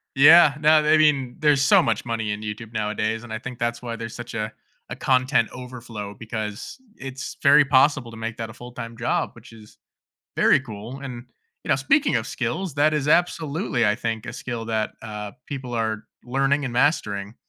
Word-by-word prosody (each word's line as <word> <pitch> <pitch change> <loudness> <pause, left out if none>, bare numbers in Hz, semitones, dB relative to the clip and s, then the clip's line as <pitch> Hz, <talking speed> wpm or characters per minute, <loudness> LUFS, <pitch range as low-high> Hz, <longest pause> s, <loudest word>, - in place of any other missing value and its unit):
Yeah, 145 +2 +8
no, 155 0 +5
th 150 - +4
I - - +7
mean, 140 -5 +2
there's 150 -3 +3
so 135 - +6
much 115 -2 -1
money 115 -3 -2
in 105 - -4
YouTube 110 +1 -6
nowadays, 110 +1 -2
and 110 - -9
I 110 - -3
think 125 +1 -8
that's 120 0 -2
why 115 -1 -4
there's 115 0 -7
such 120 0 -8
a 110 -1 -3 0.4
a - - -5
content 130 +1 +2
overflow, 120 -5 -8
because 110 - -6 0.2
it's 135 +1 -7
very 145 +1 +7
possible 135 -2 +3
to 115 - -11
make 115 0 -5
that 115 - -4
a 110 - -11
full-time 120 -1 -8
job, 115 +1 0
which 115 0 -15
is 110 -1 -15 0.6
very - - +5
cool, 115 +1 -8
and, 125 -3 -7 0.4
you - - -11
know, 135 - +4
speaking 275 - +2
of - - -2
skills, 145 +10 -3
that 155 +1 +3
is 150 -1 -1
absolutely, 160 - +1
I 105 - +3
think, 115 -1 -3
a - - -5
skill 120 -2 -5
that, 110 -1 -1
uh, 105 -2 -6
people 130 -4 -6
are 110 -1 -2 0.2
learning 135 +3 +1
and 125 - -3
mastering, 110 -6 0
120 Hz, 195 wpm, -23 LUFS, 110-140 Hz, 0.6 s, Yeah